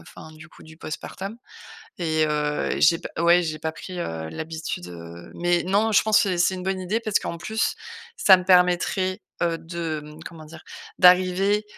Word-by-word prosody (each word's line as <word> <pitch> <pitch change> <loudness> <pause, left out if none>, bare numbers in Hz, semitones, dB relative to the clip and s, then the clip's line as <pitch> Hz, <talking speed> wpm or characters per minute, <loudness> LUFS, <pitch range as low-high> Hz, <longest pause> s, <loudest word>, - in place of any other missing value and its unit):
enfin 155 - -13
du 155 0 -14
coup - - -18
du 160 0 -15
post-partum 195 +6 -7 0.6
et 160 -3 +1
heu, 150 -1 -1
j'ai 165 +2 +5
pas - - -7
ouais, 170 +1 +5
j'ai 155 -2 -4
pas 160 +1 -3
pris, 180 +2 -9
heu, 80 - -4
l'habitude, 155 - -6
heu, 85 0 -11
mais 175 0 +1
non, 205 +4 +2
je 205 - +5
pense 215 -1 +4
et 185 -2 0
c'est 180 +2 +2
une 185 - -6
bonne 190 0 -2
idée 195 +5 -1
parce 215 -3 +1
qu'en 170 - -6
plus, 220 +6 -1 0.4
ça 190 - +7
me 185 - -6
permettrait, 180 +1 +2 0.2
heu, 170 -1 +1
de, 165 -2 -5
mmh, 150 +1 -12
comment 165 -3 -10
dire? 155 +2 -13 0.4
D'arriver 185 +3 +4
175 Hz, 190 wpm, -24 LUFS, 155-185 Hz, 0.6 s, ça